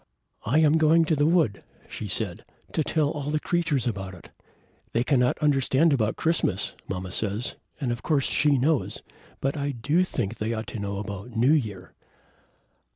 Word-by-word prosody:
"I 130 +7 +3
am 155 0 +5
going 160 +1 +5
to 160 - +2
the 145 +1 +2
wood," 160 - +2 0.2
she 105 - -6
said, 100 0 0 0.3
"to 155 - 0
tell 150 -1 +1
the 150 +2 -1
creatures 155 -7 0
all 120 - +2
about 95 -2 -7
it. 85 - -15 0.6
They 115 - +2
cannot 125 -2 +2
understand 145 +1 +3
about 110 -5 +1
Christmas, 155 - 0
mamma 90 -1 -4
says, 105 +4 -1 0.2
and 130 -5 -1
of 120 - -3
course 145 -4 +1
she 150 -2 +3
knows, 145 +3 0 0.4
but 135 +1 0
I 145 -1 -2
do 145 +7 +1
think 120 - -3
they 110 +2 -1
ought 110 0 -4
to 115 - -6
know 100 -1 -3
about 100 +3 -6
New 120 +5 +4
Year!" 105 -11 -2
130 Hz, 175 wpm, -26 LUFS, 105-150 Hz, 0.6 s, am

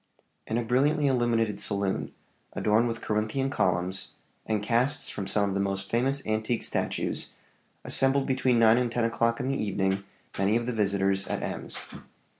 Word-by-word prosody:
In 110 - -1
a 120 - 0
brilliantly 140 +6 +2
illuminated 115 -5 +1
saloon, 100 -1 -1 0.4
adorned 110 +3 +2
with 115 -1 -4
Corinthian 110 +6 -1
columns, 90 -1 -1 0.3
and 110 -2 0
casts 125 +6 +1
from 100 -2 -5
some 100 0 +1
of - - -2
the 100 - 0
most 95 0 -3
famous 135 +4 0
antique 110 +2 -1
statues, - - -2 0.5
assembled 135 +1 +2
between 130 -2 +2
nine 115 +1 +6
and 120 -2 0
ten 120 0 0
o'clock 115 +1 +1
in 130 - -2
the 135 - -1
evening 95 -1 0 0.4
many 100 +3 +3
of 120 - -3
the 125 - -2
visitors 100 -2 +1
at - - -3
Ems. - - -4
115 Hz, 165 wpm, -28 LUFS, 100-125 Hz, 0.5 s, nine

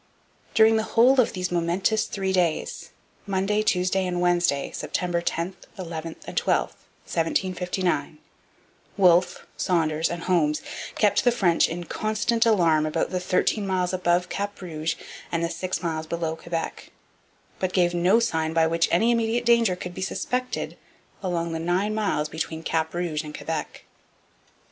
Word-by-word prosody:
During 220 0 +6
the - - +2 0.2
whole 255 +3 +7
of 235 - -1
those 180 -1 -3
momentous 175 +5 +1
three 190 -1 -2
days 175 -4 -1 0.4
Monday, 195 +2 +1
Tuesday, 185 -2 +1
and 175 -1 -2
Wednesday, 175 -5 +1
September 175 -1 -2
10, 170 +2 -2 0.2
11, 165 -3 -5
and - - -8
12, - - +2
1759 180 0 -2 0.8
Wolfe, 180 -2 +4
Saunders, 160 -2 +1
and 170 -1 -5
Holmes 155 -4 +1 0.3
kept 205 -2 +3
the 245 - +5
French 185 -8 +3
in 175 +2 -4
constant 220 +5 0
alarm 165 -8 +3
about 155 - -1
the 185 - -1
thirteen 185 +3 0
miles 185 -1 0
above 180 -1 +1
Cap 205 0 -4
Rouge 160 -3 -3 0.4
and 170 0 0
the 170 - 0
six 185 +2 -3
miles 160 -2 -2
below 165 -1 -2
Quebec; 165 0 -5 0.7
but 185 -1 -1
gave 175 -2 +2
no 180 +6 +4
sign 160 -8 0
by 165 0 +4
which 165 +1 +2
any 220 +8 +3
immediate 230 +1 +1
danger 235 -5 +4
could 180 0 -7
be - - -7
suspected 250 +6 -3 0.4
along 170 -3 -2
the 165 - -3
nine 180 +5 0
miles 200 -8 0
between 160 +1 -4
Cap 160 0 -1
Rouge 170 -4 -1
and 150 -1 -8
Quebec. 160 -1 -5
180 Hz, 150 wpm, -25 LUFS, 165-195 Hz, 0.8 s, whole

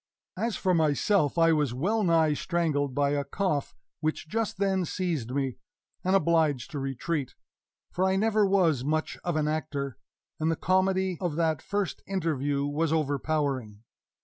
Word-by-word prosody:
As 225 +3 -1
for 185 -2 +1
myself, 160 +1 +2
I 165 0 +5
was 145 -6 0
well 205 - +1
nigh 165 -4 +3
strangled 145 -5 -1
by 140 0 +2
a 145 -1 0
cough 155 -2 -2 0.2
which 155 +1 -2
just 220 +4 -2
then 190 -1 +1
seized 165 -8 -2
me, 135 -1 -2 0.5
and 185 +1 +2
obliged 160 -5 +2
to 145 - -4
retreat 135 +2 -3 0.6
for 185 - +1
I 190 0 +2
never 215 +1 +3
was 180 -9 +3
much 155 +3 -1
of 175 -2 -1
an 155 -1 +1
actor, 145 -5 -3 0.4
and 160 +1 +1
the 165 - +1
comedy 190 -1 +1
of 175 -5 -1
that 160 -2 +1
first 205 -4 -2
interview 145 -7 -1
was 150 +2 0
overpowering. 140 -7 -1
160 Hz, 155 wpm, -28 LUFS, 145-185 Hz, 0.6 s, I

